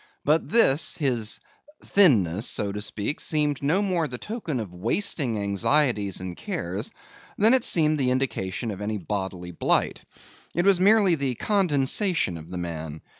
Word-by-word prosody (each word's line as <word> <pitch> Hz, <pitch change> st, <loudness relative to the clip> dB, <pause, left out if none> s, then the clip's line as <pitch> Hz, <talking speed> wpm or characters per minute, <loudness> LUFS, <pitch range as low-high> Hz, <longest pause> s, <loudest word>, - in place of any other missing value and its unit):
But 155 Hz, +3 st, +2 dB
this, 165 Hz, -10 st, +4 dB
his 120 Hz, -7 st, -1 dB, 0.4 s
thinness, 110 Hz, -, +3 dB
so 100 Hz, -1 st, -1 dB
to 105 Hz, +1 st, -5 dB
speak, 105 Hz, +5 st, -3 dB
seemed 150 Hz, -3 st, -1 dB
no 165 Hz, +9 st, +1 dB
more 180 Hz, -5 st, 0 dB
the 125 Hz, -, -6 dB
token 190 Hz, -, -5 dB
of 100 Hz, -6 st, -6 dB
wasting 120 Hz, -, -1 dB
anxieties 105 Hz, +1 st, +1 dB
and 90 Hz, -1 st, -6 dB
cares, -, -, -4 dB, 0.5 s
than 220 Hz, +4 st, +5 dB
it 260 Hz, -3 st, +4 dB
seemed 155 Hz, -2 st, +2 dB
the 130 Hz, -2 st, +1 dB
indication 120 Hz, -4 st, -2 dB
of 100 Hz, 0 st, -7 dB
any 105 Hz, +1 st, -2 dB
bodily 95 Hz, -2 st, -5 dB
blight. 85 Hz, -, 0 dB, 0.5 s
It 175 Hz, +2 st, +1 dB
was 195 Hz, -3 st, +4 dB
merely 200 Hz, -1 st, +5 dB
the 140 Hz, -5 st, -1 dB
condensation 175 Hz, -, +1 dB
of 80 Hz, 0 st, -10 dB
the 90 Hz, -, -6 dB
man. 80 Hz, -3 st, -6 dB
130 Hz, 155 wpm, -25 LUFS, 100-165 Hz, 0.5 s, than